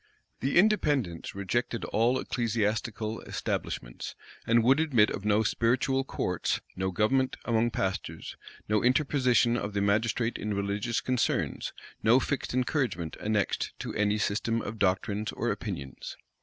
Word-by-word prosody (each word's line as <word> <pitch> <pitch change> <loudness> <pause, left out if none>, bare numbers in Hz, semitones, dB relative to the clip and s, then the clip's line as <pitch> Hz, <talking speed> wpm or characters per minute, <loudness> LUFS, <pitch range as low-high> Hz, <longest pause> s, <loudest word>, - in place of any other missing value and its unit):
The 135 +5 0
Independents 145 - +2
rejected 115 +4 -1
all 115 +4 +2
ecclesiastical 110 -2 -1
establishments, - - -4 0.3
and 115 0 +4
would 135 +5 +5
admit 130 -10 +4
of 100 - -5
no 105 +1 +3
spiritual 130 +4 +1
courts, 90 -9 -1 0.2
no 95 0 -1
government 130 +8 +1
among 115 0 +2
pastors, 95 -4 -3 0.3
no 105 0 +2
interposition 125 -2 +3
of 100 -3 -3
the 100 - 0
magistrate 110 +3 +1
in 105 -1 -2
religious 100 +4 -1
concerns, 125 -2 0 0.3
no 115 +4 +5
fixed 145 +1 -2
encouragement 125 - -1
annexed 105 -2 0
to - - -5
any 105 0 +1
system 110 +2 0
of 110 +1 -6
doctrines 100 +2 0
or - - -1
opinions. 65 -2 -6
110 Hz, 130 wpm, -29 LUFS, 100-125 Hz, 0.3 s, would